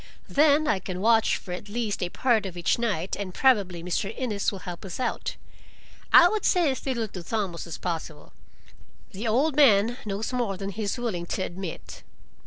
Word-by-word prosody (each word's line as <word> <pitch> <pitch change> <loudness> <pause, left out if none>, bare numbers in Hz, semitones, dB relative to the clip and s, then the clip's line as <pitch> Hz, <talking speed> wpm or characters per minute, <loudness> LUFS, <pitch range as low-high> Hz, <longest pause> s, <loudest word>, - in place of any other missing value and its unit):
Then 300 +1 +4
I 200 - +2
can 185 0 -5
watch 225 +2 +3
for 180 - -10
at 185 +3 -6
least 220 -1 -2
a 180 - -1
part 225 -1 +1
of 180 -2 -9
each 175 - +1
night 195 -7 -1
and 185 -3 -5
probably 200 -10 +2
Mr. 180 +4 -2
Innes 215 -6 -1
will 200 - -6
help 175 -2 -7
us 195 +3 -7
out. 250 -2 -2 0.8
I 345 - +9
would 425 +1 -1
say 345 -6 +3
as 260 - -5
little 235 -4 -1
to 185 - -7
Thomas 185 -3 -3
as 165 - -6
possible. 160 -3 -5 0.8
The 215 +3 -5
old 265 +7 +2
man 240 -5 +5
knows 210 +4 -3
more 235 -6 -1
than 195 +1 -4
he 220 - -6
is 205 +4 -1
willing 200 -8 -3
to 190 - -2
admit." 180 -1 -7
205 Hz, 195 wpm, -26 LUFS, 185-240 Hz, 0.8 s, I